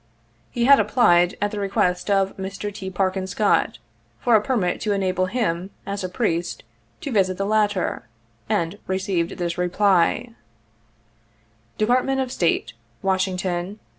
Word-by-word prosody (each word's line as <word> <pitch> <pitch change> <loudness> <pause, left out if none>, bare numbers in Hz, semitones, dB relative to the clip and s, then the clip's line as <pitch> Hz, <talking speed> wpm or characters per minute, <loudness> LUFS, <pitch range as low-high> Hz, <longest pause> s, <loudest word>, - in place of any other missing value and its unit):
He 235 -1 -1
had 280 +1 +7
applied, 175 -7 +4
at 205 0 0
the 210 - -4
request 195 -2 0
of 195 -1 +2
Mr. 195 +2 -5
T. 190 -1 -6
Parkin 190 0 -1
Scott, 205 +2 +1 0.4
for 240 - +2
a 215 - +5
permit 215 -7 -1
to 210 - 0
enable 185 -2 0
him, 185 -5 -1 0.2
as 200 -1 -4
a 185 - -3
priest, 175 -5 -2 0.4
to 280 - -4
visit 185 -4 +2
the 195 - -1
latter, 205 - 0 0.4
and 170 +4 -1
received 190 -2 -1
this 175 -1 -3
reply: 195 +5 +2 1.4
"Department 255 +4 +2
of 260 -2 -2
State, 165 - 0 0.2
" 115 - -37
Washington, 185 -2 0
Nov. - - -15
190 Hz, 145 wpm, -23 LUFS, 180-210 Hz, 1.4 s, had